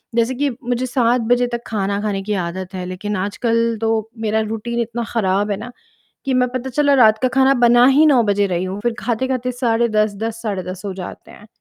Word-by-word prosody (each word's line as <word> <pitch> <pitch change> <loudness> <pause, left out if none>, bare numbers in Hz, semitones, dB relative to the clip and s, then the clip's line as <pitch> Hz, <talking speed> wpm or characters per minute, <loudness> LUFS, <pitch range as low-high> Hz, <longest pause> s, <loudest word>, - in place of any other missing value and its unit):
जैसे 235 +2 +1
कि 285 +2 0
मुझे 245 +1 -1
7 245 -1 +1
बजे 245 0 +3
तक 235 -1 -4
खाना 200 -2 -1
खाने 200 -2 -2
की 210 - -2
आदत 185 0 -4
है 180 -1 -5
लेकिन 185 +3 -4
आजकल 230 +3 0
तो 225 -1 0
मेरा 220 0 0
रूटीन 225 +2 -3
इतना 235 +1 -3
खराब 205 -1 +1
है 200 - -1
ना, 235 +4 -8 0.5
कि 270 - 0
मैं 250 0 +3
पता 255 +1 -4
चला 285 +2 +2
रात 220 -4 +5
का - - +5
खाना 270 0 +5
बना 240 +1 +6
ही 290 +4 +5
9 275 -5 +5
बजे 205 -1 +1
रही 180 -1 -1
हूँ, 190 +2 -4
फिर 240 0 0
खाते-खाते 250 +1 -1
साढ़े 235 -1 +1
10 215 -1 +1
10 230 0 -4
साढ़े 200 -4 -2
10 185 +1 -9
हो 195 - -3
जाते 185 -1 -9
हैं। 210 - -15
225 Hz, 220 wpm, -19 LUFS, 205-245 Hz, 0.5 s, बना